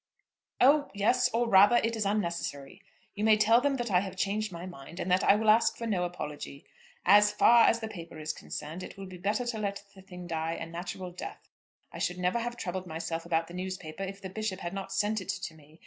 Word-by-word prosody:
"Oh 285 Hz, +3 st, +5 dB
yes; 215 Hz, +5 st, +3 dB
or 235 Hz, +1 st, +1 dB
rather, 205 Hz, +2 st, +7 dB
it 230 Hz, -1 st, +2 dB
is 215 Hz, -3 st, -1 dB
unnecessary. 170 Hz, -9 st, -3 dB, 0.3 s
You 210 Hz, -, -4 dB
may 215 Hz, -1 st, +6 dB
tell 225 Hz, +3 st, +5 dB
them 280 Hz, 0 st, +1 dB
that 240 Hz, -4 st, -3 dB
I 180 Hz, -, +5 dB
have 190 Hz, 0 st, -5 dB
changed 205 Hz, +2 st, -1 dB
my 170 Hz, 0 st, -7 dB
mind, 170 Hz, 0 st, -10 dB
and 185 Hz, -, -2 dB
that 185 Hz, +2 st, +3 dB
I 200 Hz, -, +6 dB
will 215 Hz, 0 st, +4 dB
ask 225 Hz, +2 st, +3 dB
for 230 Hz, -, -5 dB
no 190 Hz, -6 st, 0 dB
apology. 150 Hz, -5 st, -7 dB, 0.4 s
As 205 Hz, +2 st, +6 dB
far 235 Hz, +2 st, +6 dB
as 230 Hz, -, +2 dB
the 220 Hz, -, -3 dB
paper 170 Hz, -6 st, -9 dB
is 155 Hz, 0 st, -3 dB
concerned, 160 Hz, +5 st, -7 dB
it -, -, -9 dB
will 195 Hz, -, -7 dB
be 185 Hz, -1 st, -10 dB
better 210 Hz, +6 st, 0 dB
to 235 Hz, -2 st, -3 dB
let 200 Hz, -1 st, -3 dB
the 190 Hz, -, -14 dB
thing 180 Hz, -2 st, -10 dB
die 165 Hz, -1 st, -2 dB
a 165 Hz, -, -5 dB
natural 175 Hz, +2 st, -6 dB
death. 175 Hz, -, -9 dB, 0.5 s
I -, -, -7 dB
should 180 Hz, -, -1 dB
never 180 Hz, +5 st, 0 dB
have 240 Hz, +1 st, -4 dB
troubled 185 Hz, -2 st, -4 dB
myself 165 Hz, +1 st, -4 dB
about 165 Hz, -1 st, +1 dB
the 170 Hz, -, -12 dB
newspaper 185 Hz, -2 st, -6 dB
if 195 Hz, 0 st, -5 dB
the 190 Hz, -, -7 dB
Bishop 210 Hz, -2 st, -3 dB
had 175 Hz, +1 st, -4 dB
not 195 Hz, -1 st, -5 dB
sent 210 Hz, 0 st, 0 dB
it 185 Hz, -, -10 dB
to 185 Hz, -4 st, -3 dB
me. 155 Hz, +1 st, -19 dB
190 Hz, 235 wpm, -29 LUFS, 175-215 Hz, 0.5 s, rather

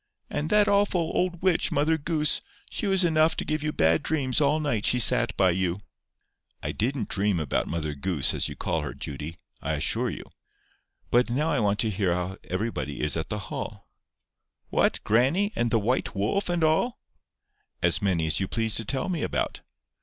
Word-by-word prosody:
"And 150 Hz, +2 st, -2 dB
that 210 Hz, 0 st, +4 dB
awful 200 Hz, -5 st, +2 dB
old 180 Hz, -1 st, -1 dB
witch, 185 Hz, -3 st, +2 dB
Mother 150 Hz, +3 st, +2 dB
Goose. 155 Hz, 0 st, +1 dB, 0.3 s
She 210 Hz, -, -2 dB
was 190 Hz, -1 st, +3 dB
enough 160 Hz, -1 st, +3 dB
to -, -, -1 dB
give 155 Hz, 0 st, -1 dB
you 150 Hz, 0 st, -1 dB
bad 80 Hz, -, +3 dB
dreams 145 Hz, -3 st, 0 dB
all 145 Hz, +2 st, +3 dB
night 135 Hz, -9 st, -1 dB
she 125 Hz, -, +4 dB
sat 115 Hz, 0 st, +4 dB
by 95 Hz, -2 st, +4 dB
you." 90 Hz, 0 st, 0 dB, 0.9 s
"I -, -, -2 dB
didn't 120 Hz, -1 st, -1 dB
dream 100 Hz, -2 st, 0 dB
about 75 Hz, -4 st, -1 dB
Mother 75 Hz, -2 st, -3 dB
Goose, 75 Hz, 0 st, 0 dB
as -, -, +1 dB
you -, -, -7 dB
call -, -, -1 dB
her, -, -, -5 dB
Judy. 75 Hz, +4 st, -6 dB, 0.2 s
I 80 Hz, -, -2 dB
assure 75 Hz, 0 st, 0 dB
you. -, -, -6 dB, 0.9 s
But 120 Hz, 0 st, +3 dB
now 150 Hz, +7 st, 0 dB
I 145 Hz, -, +1 dB
want 105 Hz, -2 st, +1 dB
to 110 Hz, -, 0 dB
hear 95 Hz, -3 st, 0 dB
how 90 Hz, +2 st, -3 dB
everybody 90 Hz, -, -3 dB
is 75 Hz, -, 0 dB
at 80 Hz, -, -3 dB
the 105 Hz, -, -2 dB, 0.2 s
Hall." -, -, -6 dB, 0.8 s
"What, -, -, +1 dB
grannie, 145 Hz, -, +2 dB
and 120 Hz, 0 st, +1 dB
the 115 Hz, -, +3 dB
white 120 Hz, +1 st, -1 dB
wolf, 110 Hz, -, 0 dB
and 175 Hz, -2 st, 0 dB
all?" 160 Hz, +10 st, +2 dB, 0.9 s
"As -, -, +2 dB
many 90 Hz, -5 st, +1 dB
as 80 Hz, -, +1 dB
you 95 Hz, -, -1 dB
please 115 Hz, 0 st, -1 dB
to 115 Hz, -, -2 dB
tell 130 Hz, +4 st, -1 dB
me 175 Hz, -5 st, -2 dB
about." -, -, -2 dB
120 Hz, 190 wpm, -26 LUFS, -, 0.9 s, that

